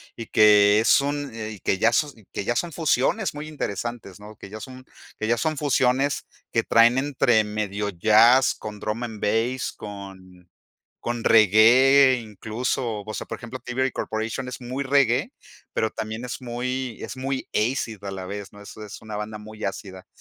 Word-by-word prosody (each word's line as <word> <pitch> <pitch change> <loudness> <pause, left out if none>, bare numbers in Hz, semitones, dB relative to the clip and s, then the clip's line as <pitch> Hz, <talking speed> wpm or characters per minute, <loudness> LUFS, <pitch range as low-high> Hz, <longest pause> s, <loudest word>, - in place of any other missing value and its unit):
y 115 - -7
que 105 0 +6
es 115 - +4
un, 145 -1 -3
eh, 110 -2 -6
que 95 - 0
ya 115 - +4
son 145 +4 +1 0.2
que - - -4
ya 120 - 0
son 170 +6 -1
fusiones 165 - +1
muy 150 +1 -7
interesantes, 120 -7 -5
¿no? 105 +1 -12
Que 100 - -11
ya 110 - -7
son 130 +2 -10 0.3
que 110 - -2
ya 120 - +3
son 155 +6 -1
fusiones 135 0 +1 0.2
que 115 - +2
traen 115 +3 +4
entre 125 -5 +2
medio 105 -1 -3
jazz 110 +7 +5
con 105 -1 -8
drum 105 +3 -3
and 110 -3 -6
bass, 115 +5 0
con 95 -3 -11 0.5
con 120 -1 -3
reggae 120 +6 +6
incluso, 110 +1 -3
o 110 - -6
sea, - - -5
por - - -5
ejemplo 125 +2 -8
Thievery 130 +1 -2
Corporation 115 +4 -3
es 125 - -7
muy 130 +3 -4
reggae, 140 - +2 0.4
pero 110 - 0
también 110 +3 -5
es 125 - -6
muy 125 0 -4
es - - -6
muy 135 0 -3
acid 110 -2 -1
a 100 - -4
la 95 -1 -6
vez, 100 +1 -7
¿no? 105 - -12
Eso 110 - -11
es - - -11
una 110 -1 -6
banda 105 +1 -5
muy 110 +1 -9
ácida. 95 -1 -6
115 Hz, 180 wpm, -24 LUFS, 105-130 Hz, 0.5 s, que